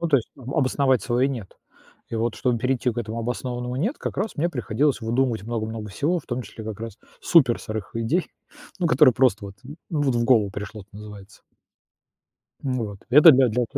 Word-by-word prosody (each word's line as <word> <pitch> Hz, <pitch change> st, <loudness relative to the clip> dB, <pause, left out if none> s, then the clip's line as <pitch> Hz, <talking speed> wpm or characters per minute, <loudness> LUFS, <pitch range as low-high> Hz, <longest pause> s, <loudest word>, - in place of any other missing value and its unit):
Ну, 170 Hz, -, -1 dB
то 145 Hz, -, +5 dB
есть, 120 Hz, -, -2 dB
обосновать 130 Hz, -1 st, +1 dB
свое 125 Hz, +2 st, +1 dB
"нет". 115 Hz, -8 st, -7 dB, 0.5 s
И -, -, -4 dB
вот 115 Hz, +1 st, -1 dB
чтобы 125 Hz, -3 st, 0 dB
перейти 125 Hz, +1 st, 0 dB
к 120 Hz, -, -6 dB
этому 115 Hz, 0 st, -4 dB
обоснованному 125 Hz, +1 st, -4 dB
"нет", 215 Hz, -, -1 dB
как -, -, -5 dB
раз 205 Hz, +2 st, -2 dB
мне 165 Hz, +3 st, +1 dB
приходилось 135 Hz, +1 st, 0 dB
выдумывать 115 Hz, -1 st, 0 dB
много-много 110 Hz, -1 st, -4 dB
всего, 170 Hz, -, 0 dB
в -, -, -25 dB
том 125 Hz, 0 st, -3 dB
числе 110 Hz, -, -10 dB
как 110 Hz, -2 st, -6 dB
раз 115 Hz, -2 st, -7 dB, 0.2 s
супер 135 Hz, -9 st, +4 dB
сырых 110 Hz, 0 st, -6 dB
идей, 140 Hz, +11 st, 0 dB, 0.5 s
ну 180 Hz, -, +1 dB
которые 130 Hz, 0 st, +6 dB
просто, 110 Hz, -5 st, +2 dB, 0.4 s
ну, 150 Hz, -3 st, 0 dB
вот, 135 Hz, -3 st, +1 dB
в 120 Hz, -, +1 dB
голову 115 Hz, -5 st, +3 dB
пришло, 105 Hz, +1 st, -7 dB
это 100 Hz, -, -26 dB
называется. 105 Hz, -1 st, -12 dB, 1.2 s
Вот, 115 Hz, -7 st, -3 dB
это 150 Hz, +4 st, +9 dB
для 130 Hz, -1 st, +4 dB
для. 120 Hz, +3 st, 0 dB
120 Hz, 185 wpm, -24 LUFS, 110-135 Hz, 1.2 s, это